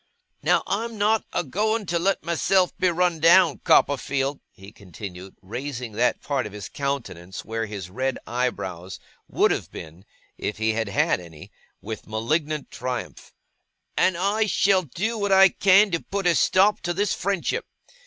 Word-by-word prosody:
'Now, - - +2
I'm 225 +2 -3
not 215 +2 +2
a 175 - -1
going 215 - -1
to 170 -1 -1
let 195 +3 0
myself 175 +2 +1
be 185 - +2
run 175 -1 +1
down, 170 -1 +5
Copperfield,' 140 0 +2
he 95 +2 -14
continued, 95 -1 -10
raising 120 +3 -5
that 120 +4 0
part 135 -6 -1
of 105 - -12
his 105 -2 -7
countenance, 125 - -5
where 115 0 -3
his 100 -4 -7
red 130 +5 -2
eyebrows 95 -7 -3 0.3
would - - +2
have - - -2
been 85 +3 -10 0.4
if 105 - -3
he 110 0 +1
had 110 -2 -2
had 95 - +1
any, 80 -4 -13 0.3
with 110 -2 -7
malignant 145 +8 -2
triumph, 130 -1 -5 0.6
'and 185 -2 +2
I 205 +4 +1
shall 195 -1 +3
do 210 - -3
what 205 -1 -1
I 195 0 +7
can 195 +2 +4
to 170 - 0
put 200 -1 -4
a 175 - +5
stop 195 +5 +3
to 175 0 -2
this 205 +2 +1
friendship. 200 - -2
145 Hz, 165 wpm, -24 LUFS, -, 0.6 s, I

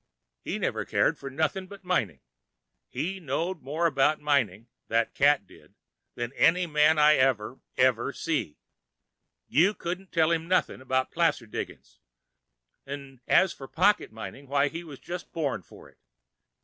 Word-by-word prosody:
He - - -3
never - - -1
cared - - +1
for 135 - -6
nothing 160 +7 -1
but 200 0 -12
mining. 115 - -1 0.7
He 190 +4 -3
knowed 165 +3 -2
more 150 +6 -2
about 150 -1 +3
mining, 120 -8 0 0.2
that 115 0 +1
cat 145 -6 +3
did, - - -19 0.4
than 120 +1 -4
any 180 +5 +4
man 155 0 +4
I 150 0 +6
ever, 130 -2 +1 0.2
ever 125 0 +3
see. 150 - -2 0.9
You 185 +8 +3
couldn't 185 +2 -5
tell 160 0 +3
him 165 0 0
noth'n' 185 -7 0
'bout 130 0 +1
placer 165 -8 +1
diggin's—'n' 60 - -11
as 190 - +4
for 135 - -10
pocket 190 - +2
mining, 120 +5 -9
why 140 +1 +2
he 165 +4 -6
was 150 -5 -10
just 175 +5 -7
born 150 -5 -2
for - - -15
it. - - -23
145 Hz, 150 wpm, -27 LUFS, 130-170 Hz, 0.9 s, I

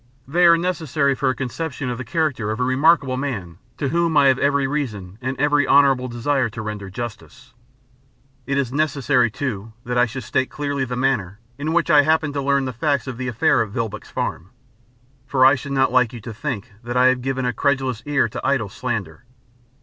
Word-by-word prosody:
They 175 +5 +4
are 170 0 +7
necessary 160 -5 0
for 130 0 0
a 130 - 0
conception 135 0 -4
of 120 - -5
the - - -4
character 130 -5 -1
of 110 +2 -3
a - - +1
remarkable 135 +1 +3
man 100 - -4 0.2
to 140 - -1
whom 170 +1 +1
I 140 -1 +6
have 130 - +2
every 140 -1 +2
reason 110 -9 -4
and 130 +1 -3
every 145 0 +2
honourable 135 -2 +4
desire 125 +1 0
to 110 - -7
render 105 -2 -5
justice. 120 +4 -8 0.9
It 140 - 0
is 135 -2 -1
necessary, 140 -4 +2
too, 110 -3 -5
that 125 0 0
I 125 - +4
should 130 +3 -6
state 130 +3 -1
clearly 145 -2 -2
the 125 0 -4
manner 120 -7 0 0.2
in 155 +2 -2
which 170 0 +2
I 145 -1 +7
happened 155 0 +1
to 140 - -2
learn 140 0 +1
the 130 - -4
facts 140 +3 0
of 130 -3 -6
the 130 - -3
affair 120 0 +2
at 110 - -2
Vilboek's 105 0 -4
Farm, 85 +4 -4 0.8
for 130 -1 +3
I 135 - +7
should 140 0 -4
not 135 -2 +2
like 125 -2 +3
you 120 - -8
to 115 +1 -7
think 120 -1 -5
that 120 +1 -3
I 125 - +5
have 130 -1 +3
given 130 0 -2
a 125 - 0
credulous 130 -2 0
ear 140 -5 +2
to - - -6
idle - - 0
slander. - - -4
130 Hz, 210 wpm, -21 LUFS, 120-145 Hz, 0.9 s, are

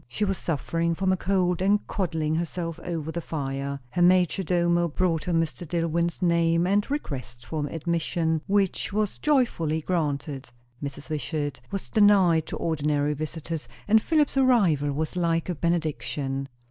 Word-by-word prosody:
She 205 +12 -1
was 195 -2 -1
suffering 165 +1 -1
from 190 +2 +1
a - - +3
cold, 180 -2 +1
and 200 +2 +2
coddling 160 -5 -1
herself 165 0 -3
over 160 -2 -4
the 170 - -3
fire. 140 -3 -3
Her 175 - -1
major 180 +1 +4
domo 175 -1 +2
brought 165 0 0
her 180 - -1
Mr. 165 0 0
Dillwyn's 170 +1 -1
name 170 0 +3
and 200 +5 +1
request 130 - -5
for 150 -2 -3
admission, 165 0 -1
which 200 -1 +1
was 210 0 -1
joyfully 230 - +1
granted. 145 -5 -2 0.3
Mrs. 140 +2 -6
Wishart 145 -1 -3
was 195 -1 -4
denied 195 -7 +4
to - - -4
ordinary 150 -2 0
visitors; 155 +1 -5 0.2
and 220 +1 +5
Philip's 300 -1 +1
arrival 195 - +3
was 155 +4 -3
like 165 -1 0
a - - +1
benediction. 145 -4 -2
165 Hz, 150 wpm, -26 LUFS, 150-185 Hz, 0.3 s, and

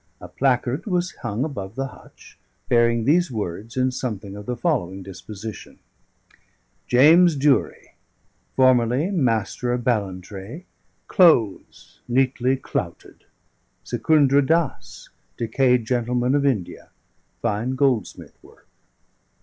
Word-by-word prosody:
A - - -10
placard 130 - -1
was 180 -2 -1
hung 105 +5 -2
above 110 -9 -6
the 135 0 -3
hutch, - - -17 0.3
bearing 115 -1 +3
these 175 +6 +3
words 110 +2 -6
in 130 0 +2
something 105 -6 -5
of 105 0 -10
the 125 - -2
following 95 - -2
disposition: 105 +3 -9 1.1
JAMES 160 +7 +5
DURIE, 140 -1 0 0.6
FORMERLY 130 - +3
MASTER 120 - 0
OF 125 -1 -3
BALLANTRAE. 100 - -4 0.4
CLOTHES 115 - +2
NEATLY 130 +1 +1
CLOUTED. - - -6 0.6
______ - - -21
SECUNDRA 145 -3 +3
DASS, 165 +1 -2 0.3
DECAYED 125 +1 +1
GENTLEMAN 125 +1 0
OF 140 -1 +2
INDIA. 105 -10 -3 0.5
FINE 115 +3 -1
GOLDSMITH 125 -9 -1
WORK. - - -21
125 Hz, 110 wpm, -22 LUFS, 110-140 Hz, 1.1 s, JAMES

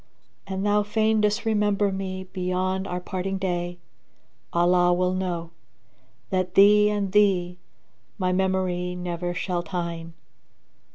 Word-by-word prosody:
An 190 0 -3
thou 205 0 +3
fain 215 +1 +1
disremember 210 -1 +1
me 190 -1 -4
beyond 185 +1 -1
our 180 - -3
parting 190 +1 -3
day, 175 -2 -2 0.4
* 65 0 -42
Allah 175 +1 +3
will 180 +1 +1
know, 175 -3 -3 0.8
that 185 -1 -1
thee 210 +1 +7
and 205 -2 -1
thee 185 -4 +2 0.6
my 185 -3 0
memory 185 -1 0
never 175 0 -4
shall 180 -1 -2
tyne. 170 -2 -5
185 Hz, 120 wpm, -25 LUFS, 175-200 Hz, 0.8 s, thee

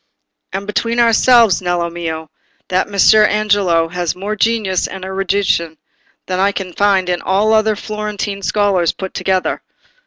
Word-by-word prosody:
"And 195 +1 -4
between 230 +3 -1
ourselves, 230 -3 +4
Nello 175 -1 -1
mio, 160 -2 -6 0.4
that 185 +2 0
Messer 205 +2 +5
Angelo 205 -6 +2
has 175 -1 -3
more 200 +3 -4
genius 215 -4 0
and 190 -1 -8
erudition 190 -4 -1 0.5
than 185 0 -3
I 200 +1 +3
can 190 -3 -6
find 195 -2 +2
in 175 -1 -1
all 200 +3 +1
the 220 - +5
other 215 0 +1
Florentine 210 -1 -5
scholars 190 -1 +1
put 190 -1 -7
together. 190 -1 -1
195 Hz, 150 wpm, -16 LUFS, 180-210 Hz, 0.5 s, Messer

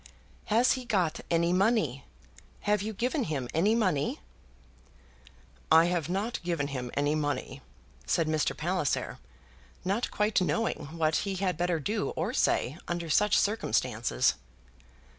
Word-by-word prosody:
"Has 230 +4 +3
he 255 - -1
got 190 -9 0
any 170 +1 +2
money? 180 - +1 0.6
Have 210 -1 +1
you 215 +2 -3
given 250 +6 -1
him 140 -6 -3
any 200 +8 +3
money?" 180 -11 0 1.5
"I 165 +1 +7
have 175 -2 -1
not 200 +6 -2
given 170 -5 -2
him 125 -3 -4
any 145 +1 +1
money," 145 -2 -2 0.5
said 165 - +1
Mr. 155 -1 0
Palliser, 175 -3 -1 0.7
not 200 +6 0
quite 210 -1 +1
knowing 225 -1 -1
what 155 -1 +2
he 195 -1 -2
had 185 -1 0
better 175 0 0
do 205 +7 -1
or - - -2
say 145 +7 +1
under 170 -2 -3
such 210 +4 +4
circumstances. 125 - +1
175 Hz, 135 wpm, -29 LUFS, 155-210 Hz, 1.5 s, I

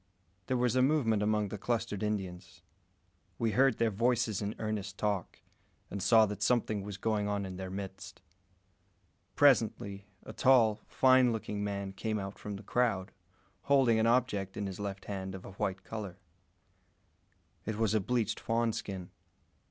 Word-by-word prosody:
There 130 - +1
was 125 0 +1
a 130 - +4
movement 130 -7 +2
among 105 -1 +1
the 105 - -6
clustered 115 -2 -2
Indians. 95 -4 -4 0.7
We 115 -1 0
heard 130 +2 +3
their 115 -1 +2
voices 115 -1 +1
in 105 +1 -3
earnest 105 -3 -4
talk, 100 -4 -2 0.5
and 100 - -4
saw 110 +2 +6
that 105 -1 -6
something 110 -4 +1
was 100 0 -6
going 105 0 0
on 100 -1 -1
in 95 -1 -7
their 95 0 -5
midst. 95 0 -7 1.2
Presently, 105 -7 +2 0.2
a 110 - -9
tall, 115 -5 +4
fine 130 -2 +5
looking 105 -2 -3
man 100 -1 -3
came 110 +2 -2
out 95 -1 -6
from 105 -1 -5
the 100 - -9
crowd, 100 -4 0 0.5
holding 130 -5 +4
an 110 - +3
object 110 -6 +1
in 105 - -2
his 95 -1 -6
left 100 -1 -5
hand 95 -2 -5
of 95 - -9
a - - -8
white 95 0 -3
colour. 105 -5 -6 1.5
It 110 - -1
was 110 -2 +1
a 110 - +3
bleached 115 +2 -1
fawn 115 0 0
skin. 95 -4 -6
105 Hz, 160 wpm, -31 LUFS, 100-115 Hz, 1.5 s, saw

